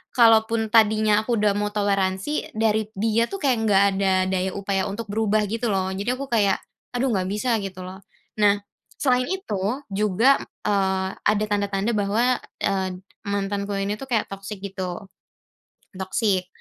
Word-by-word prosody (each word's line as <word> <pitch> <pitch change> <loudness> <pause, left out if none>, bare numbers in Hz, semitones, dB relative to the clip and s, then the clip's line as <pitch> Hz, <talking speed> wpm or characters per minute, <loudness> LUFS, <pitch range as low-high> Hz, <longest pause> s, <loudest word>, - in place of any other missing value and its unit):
kalaupun 225 -1 +4
tadinya 215 -1 +4
aku 240 - +2
udah 210 -1 +3
mau 205 0 0
toleransi 195 +5 -1
dari 220 -1 +1
dia 225 +3 +1
tuh 395 - -4
kayak 260 -4 +3
nggak 200 -1 +5 0.2
ada 190 -1 +2 0.2
daya 190 0 0
upaya 195 0 -1
untuk 210 +3 -5
berubah 215 0 +1
gitu 230 +2 -2
loh. 190 0 0
Jadi 200 +4 -4
aku 275 +1 -6
kayak, 205 -4 +3 0.4
"Aduh, 260 +1 +1
nggak 185 -4 0
bisa," 230 +3 0
gitu 185 -1 -6
loh. 185 +1 -8 0.4
Nah, 205 -1 +4 0.4
selain 250 -2 +2
itu 380 - -3 0.3
juga, 210 +7 +3
m - - -8 0.3
eee, 190 -1 +1 0.2
ada 210 0 +3
tanda-tanda 200 +2 0
bahwa, 225 +5 +2 0.3
eee, 190 -2 0 0.3
mantanku 200 0 -2
ini 200 +1 -1
tuh 270 - -6
kayak 225 -3 +1
toxic 195 +1 -7
gitu. 190 0 -5 0.9
Toxic. 190 0 0
205 Hz, 155 wpm, -24 LUFS, 195-225 Hz, 0.9 s, nggak